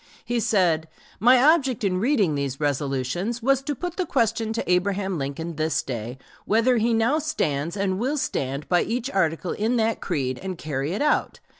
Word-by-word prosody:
He 240 0 0
said: 175 -8 +2 0.3
"My 245 +5 +6 0.2
object 265 -9 -1
in 185 -2 +1
reading 215 - +2
these 140 -2 -3
resolutions 145 - -2
was 270 +1 +3
to 290 +1 -3
put 355 +4 -5
the 370 - 0
question 225 -4 0
to 230 - -3
Abraham 190 0 0
Lincoln 145 +4 -4
this 155 -1 0
day 120 0 -5 0.3
whether 230 +4 +3
he 230 +1 +2
now 230 +7 +2
stands 170 - -2
and 190 -1 0
will 270 +6 0
stand 140 - -2
by 175 -1 +3
each 245 +4 -2
article 170 - 0
in 225 +4 0
that 225 0 0
creed 130 -8 -2
and 185 -2 -5
carry 145 +1 -3
it 210 - -1
out.... 300 - +1
195 Hz, 180 wpm, -24 LUFS, 155-240 Hz, 0.3 s, My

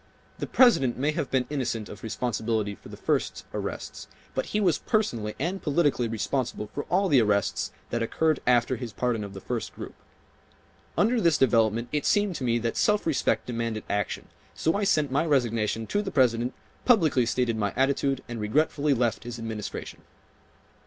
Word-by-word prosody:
The - - -3
President 225 - +4
may 145 +4 +1
have 150 -4 -3
been 130 -1 +1
innocent 120 -6 -2
of 105 - -10
responsibility 110 -1 -1
for - - -14
the - - -9
first - - -1
arrests, - - -5 0.3
but - - -2
he 210 - -1
was 180 -7 +2
personally 115 - -1
and 180 +7 -2
politically 145 -5 +1
responsible 115 -1 -2
for 145 - -4
all 195 +2 +2
the 140 -8 +5
arrests 100 -3 +1 0.2
that 120 - -1
occurred 155 +6 +1
after 125 0 +3
his 120 -4 -6
pardon 120 -4 -1
of 100 -1 -8
the - - -6
first, 115 +2 -4
group. - - -8 1.0
Under 230 +2 +3
this 165 -3 +4
development 115 -2 +3
it 150 -1 0
seemed 205 -2 +2
to - - -6
me 120 -1 +2
that 115 0 -2
self 210 0 +2
respect 160 -4 +1
demanded 115 -2 -3
action, 100 -1 -2 0.3
so 160 - +1
I 205 0 0
sent 155 -8 +2
my 140 +4 +2
resignation 115 -7 +1
to 205 - 0
the 200 - -4
President, 125 -5 +2 0.3
publicly 160 - +4
stated 120 -1 +1
my 105 -2 0
attitude 135 0 +1
and 120 -2 -5
regretfully 145 +5 +1
left 120 -2 0
his 120 0 -6
Administration." 110 -2 -6
125 Hz, 175 wpm, -27 LUFS, 115-150 Hz, 1.0 s, the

